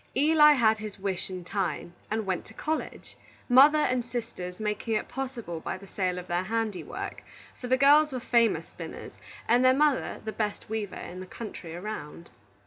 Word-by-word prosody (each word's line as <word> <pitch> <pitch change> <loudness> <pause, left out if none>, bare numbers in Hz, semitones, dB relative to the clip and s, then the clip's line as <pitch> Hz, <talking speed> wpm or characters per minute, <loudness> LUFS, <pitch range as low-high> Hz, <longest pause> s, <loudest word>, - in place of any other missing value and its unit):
Eli 300 +2 +6
had 220 -5 +3
his 215 -1 -7
wish 190 -2 -3
in 185 -1 -6
time, 180 -3 -2 0.2
and 220 0 -1
went 185 -2 -1
to 220 - -15
college, 315 0 -4 0.3
mother 275 +5 +7
and 255 -5 +1
sisters 230 -7 -6
making 215 +1 -1
it 215 - -1
possible 250 -11 -5
by 175 - -4
the 195 - -13
sale 185 -2 -2
of 180 - -6
their 175 0 0
handiwork; 220 -2 -3 0.4
for 250 - -5
the 260 +1 +3
girls 295 +3 +6
were 255 - -3
famous 235 -2 +2
spinners, - - -8 0.4
and 240 +2 +4
the 255 0 +6
mother 295 -1 +1
the 220 - -2
best 210 -2 -3
weaver 215 -3 -3
in 180 +1 -7
the 185 - -8
country 180 -6 -8
around. 175 - -7
220 Hz, 180 wpm, -28 LUFS, 185-255 Hz, 0.4 s, mother